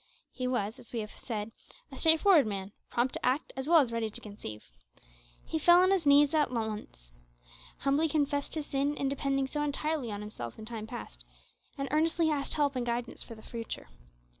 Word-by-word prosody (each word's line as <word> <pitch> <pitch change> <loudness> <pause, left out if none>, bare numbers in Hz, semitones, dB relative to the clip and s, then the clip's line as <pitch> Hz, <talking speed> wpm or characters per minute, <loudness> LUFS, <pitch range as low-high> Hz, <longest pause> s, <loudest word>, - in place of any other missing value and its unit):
He 255 -1 -3
was, 220 -4 -1
as - - -12
we 235 - -2
have 210 - -7
said, 220 -2 -5 0.4
a - - -8
straightforward 320 - +6
man, 195 -1 -4 0.2
prompt 245 +2 0
to - - -5
act 260 +4 0
as 265 +3 -4
well 340 - +7
as 250 -4 -1
ready 230 -1 -1
to 215 - -4
conceive. 155 - -9 0.7
He 320 - -2
fell 345 +3 +7
on 370 - +4
his 365 -6 +2
knees 285 +1 +6
at 305 -2 +3
once, 215 - -5 0.7
humbly 285 +4 +2
confessed 285 -1 0
his 310 -2 -2
sin 285 +1 0
in 275 - 0
depending 275 0 0
so 295 +3 -3
entirely 295 -3 -1
on 205 0 -4
himself 120 - -7
in 220 - -8
time 220 -1 -6
past, - - -8 0.5
and 275 0 -2
earnestly 320 +1 +2
asked 280 -2 -1
help 290 -2 +1
and 250 - 0
guidance 235 0 -3
for 230 - -8
the 220 - -14
future. 230 -1 -6
270 Hz, 195 wpm, -30 LUFS, 220-295 Hz, 0.7 s, well